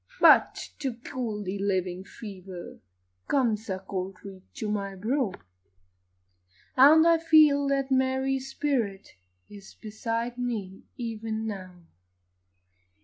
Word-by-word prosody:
But -, -, +5 dB
to 270 Hz, -5 st, -2 dB
cool 230 Hz, -3 st, -5 dB
the 195 Hz, +1 st, -4 dB
living 185 Hz, -2 st, -1 dB
fever, 190 Hz, -4 st, -10 dB, 0.5 s
Comes 225 Hz, -6 st, 0 dB
a 190 Hz, -, -1 dB
cold 190 Hz, 0 st, -5 dB
breath 195 Hz, -2 st, -10 dB
to 220 Hz, -, -4 dB
my 200 Hz, -2 st, -3 dB
brow, 225 Hz, +3 st, 0 dB, 1.4 s
And 300 Hz, +5 st, +7 dB
I 335 Hz, -1 st, +5 dB
feel 305 Hz, -3 st, +5 dB
that 275 Hz, -1 st, 0 dB
Mary's 265 Hz, 0 st, +1 dB
spirit 235 Hz, -10 st, -2 dB, 0.4 s
Is 200 Hz, -2 st, -13 dB
beside 230 Hz, +2 st, -4 dB
me, 215 Hz, -6 st, -4 dB
even 225 Hz, -2 st, -4 dB
now. 185 Hz, -4 st, -7 dB
220 Hz, 110 wpm, -27 LUFS, 195-265 Hz, 1.4 s, And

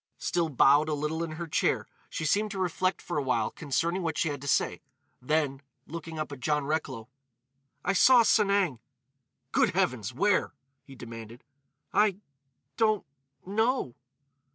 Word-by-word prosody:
Still 170 Hz, -2 st, 0 dB
bowed 145 Hz, +2 st, +4 dB
a 150 Hz, -, 0 dB
little 150 Hz, +3 st, -2 dB
in 160 Hz, -2 st, -5 dB
her 170 Hz, +2 st, -5 dB
chair, 160 Hz, -, 0 dB, 0.2 s
she -, -, -4 dB
seemed 210 Hz, +7 st, +2 dB
to 200 Hz, -, -6 dB
reflect 185 Hz, 0 st, -1 dB
for 175 Hz, -4 st, -2 dB
a -, -, 0 dB
while 120 Hz, -5 st, 0 dB
concerning 165 Hz, +5 st, -1 dB
what 165 Hz, -3 st, -2 dB
she 165 Hz, -, +1 dB
had 145 Hz, -2 st, -5 dB
to 140 Hz, -, -7 dB
say; -, -, +1 dB, 0.4 s
then, 140 Hz, 0 st, 0 dB, 0.2 s
looking 165 Hz, 0 st, -7 dB
up 155 Hz, -1 st, -4 dB
at 140 Hz, -, -7 dB
John 150 Hz, +1 st, 0 dB
Recklow: 140 Hz, -6 st, -3 dB, 0.8 s
"I 195 Hz, -, +2 dB
saw 245 Hz, +5 st, +7 dB
Sanang." 200 Hz, -, +2 dB, 0.7 s
"Good -, -, +2 dB
heavens! -, -, 0 dB
Where?" -, -, +1 dB, 0.3 s
he 135 Hz, -, -13 dB
demanded. 115 Hz, -1 st, -10 dB, 0.5 s
"I—don't—know." 185 Hz, -, -1 dB
155 Hz, 145 wpm, -28 LUFS, 135-185 Hz, 0.8 s, saw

